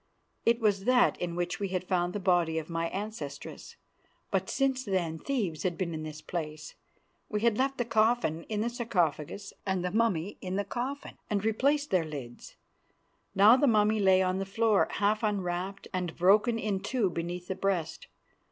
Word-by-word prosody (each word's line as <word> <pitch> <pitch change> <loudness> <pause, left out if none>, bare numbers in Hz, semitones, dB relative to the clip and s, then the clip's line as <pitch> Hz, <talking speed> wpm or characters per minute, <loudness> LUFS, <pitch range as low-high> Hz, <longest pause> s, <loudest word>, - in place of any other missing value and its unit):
It 235 0 +4
was 205 -3 +1
that 250 -1 +4
in 175 -1 -2
which 175 +3 -2
we 200 - -1
had 185 -1 -2
found 175 -1 0
the 205 - -2
body 175 -4 +2
of 160 +1 -4
my 165 0 -1
ancestress; 190 -9 -6 0.6
but - - 0
since 265 -2 +1
then 175 -6 -1
thieves 205 - -2
had 180 -2 -1
been 175 -3 -2
in 155 - -4
this 155 0 -7
place. 155 -3 -5 0.6
We 210 -1 -1
had 230 -1 +2
left 270 +1 +1
the 245 - 0
coffin 220 -7 +1
in 210 -1 -2
the 235 - 0
sarcophagus 195 - -1
and 190 -2 -1
the 180 - -1
mummy 205 -4 0
in 185 0 -3
the 200 +1 -1
coffin, 260 +7 -5
and 205 -1 -1
replaced 280 +7 +1
their 185 -3 +3
lids. 140 -6 -8 0.8
Now 205 +4 +8
the 285 - +3
mummy 215 -1 +3
lay 190 -1 +5
on 185 +1 0
the - - -1
floor, 220 0 +2
half 210 +2 +1
unwrapped 195 -2 -2
and 180 -3 -2
broken 210 +6 +4
in 210 -3 -1
two 200 -1 0
beneath 175 +1 -4
the - - -1
breast. 190 -4 -2
195 Hz, 180 wpm, -29 LUFS, 175-220 Hz, 0.8 s, Now